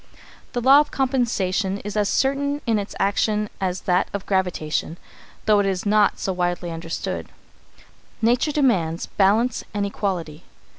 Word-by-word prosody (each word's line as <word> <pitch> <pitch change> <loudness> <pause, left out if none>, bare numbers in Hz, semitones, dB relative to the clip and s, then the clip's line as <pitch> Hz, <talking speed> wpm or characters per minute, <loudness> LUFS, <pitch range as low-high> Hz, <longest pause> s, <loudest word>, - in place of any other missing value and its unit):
The 245 - -1
law 270 +4 +7
of 300 - +1
compensation 220 -8 0
is 205 0 -6
as 210 -1 +1
certain 280 +2 +1
in 225 -2 +2
its 200 - -6
action 210 +1 +1
as 185 -1 -1
that 180 0 +1
of 200 -1 -4
gravitation, 175 -4 -1 0.5
though 210 -1 +4
it 200 - +2
is 190 0 -2
not 210 0 +3
so 190 - -2
widely 175 -1 -2
understood. 165 0 -4 0.9
Nature 240 +6 +2
demands 190 - +1
balance 220 +5 +2
and 205 -1 0
equality. 180 -6 -3
200 Hz, 145 wpm, -23 LUFS, 180-235 Hz, 0.9 s, law